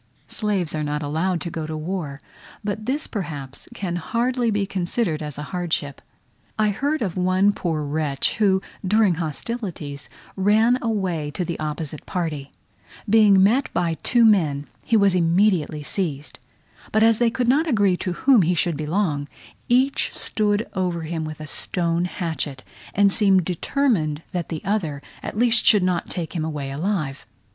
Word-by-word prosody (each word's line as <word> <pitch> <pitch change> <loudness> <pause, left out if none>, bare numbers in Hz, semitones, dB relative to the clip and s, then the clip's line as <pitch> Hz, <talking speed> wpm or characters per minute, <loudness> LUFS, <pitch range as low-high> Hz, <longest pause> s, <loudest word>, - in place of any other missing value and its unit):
Slaves 200 -7 -1
are 155 - -2
not 150 0 -2
allowed 165 +5 -1
to 170 - -4
go 160 -1 -4
to 155 0 -4
war; 155 -3 -4 0.4
but 210 +1 -4
this 285 +4 -1
perhaps 145 - -6
can 180 -6 -3
hardly 240 +6 0
be 205 -2 +1
considered 180 -2 -1
as 150 -2 -5
a 150 - -4
hardship. 165 -5 -2 0.6
I 215 -1 +3
heard 280 +8 -1
of 185 -5 -3
one 185 +2 +3
poor 160 -6 -2
wretch 145 -1 0
who, 195 -3 +3 0.2
during 205 0 +3
hostilities, 160 - -5 0.3
ran 220 +6 +3
away 185 -10 -1
to 180 - -1
the 170 - -4
opposite 155 -1 -4
party; 155 -6 -3 0.6
being 205 -3 +6
met 240 +8 +3
by 170 -2 +1
two 240 -2 +4
men, 155 -10 +3 0.2
he 230 - +3
was 200 -2 +4
immediately 170 -3 +2
seized; 150 -4 -3 0.5
but 220 - +3
as 225 -1 +5
they 240 -1 +4
could 235 +1 -1
not 295 +7 +3
agree 205 - +3
to 180 -1 -3
whom 255 +4 +4
he 175 +1 +2
should 175 -1 +1
belong, 155 -2 -1 0.4
each 260 +3 +2
stood 210 +1 +1
over 180 -4 -1
him 160 0 -3
with 155 -1 -7
a 155 - -6
stone 170 +3 0
hatchet, 160 -7 -4 0.3
and 200 0 +5
seemed 195 -5 +4
determined 175 - 0
that 175 -3 -3
the 160 -2 -5
other 165 -9 -1 0.2
at - - -6
least 235 -1 +4
should 210 -4 +5
not 180 -2 0
take 170 -3 -4
him 160 - -1
away 150 -3 -4
alive. 150 -3 -2
180 Hz, 165 wpm, -23 LUFS, 155-210 Hz, 0.6 s, being